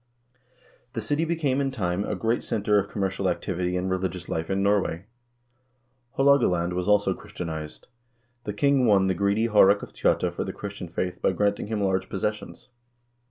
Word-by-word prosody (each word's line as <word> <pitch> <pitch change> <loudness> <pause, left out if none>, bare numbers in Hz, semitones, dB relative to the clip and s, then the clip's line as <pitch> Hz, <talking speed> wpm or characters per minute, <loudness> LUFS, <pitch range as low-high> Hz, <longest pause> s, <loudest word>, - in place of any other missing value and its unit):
The 115 - -3
city 145 +9 0
became 150 -5 0
in 135 - 0
time 100 -7 -2
a 105 - -2
great 115 +5 -1
center 105 -1 +1
of 100 +1 -3
commercial 95 -2 -1
activity 90 +1 -2
and 90 +1 -2
religious 95 -1 -2
life 80 0 -3
in 95 0 0
Norway.1 100 -4 +1 1.1
Haalogaland 120 -12 +3
was 90 0 -2
also 105 -1 +3
Christianized. 80 -3 -7 0.6
The 105 - -3
king 135 +3 +3
won 100 -2 +4
the 95 - +2
greedy 100 +5 +1
Haarek 100 -2 +5
of - - -9
Tjotta - - +1
for - - -3
the - - -5
Christian 100 -2 -7
faith 90 +2 -4
by - - +2
granting 100 +2 0
him 105 -2 -2
large 95 -1 0
pos 95 - -4
sessions. 105 +3 -4
100 Hz, 170 wpm, -26 LUFS, 90-110 Hz, 1.1 s, Haarek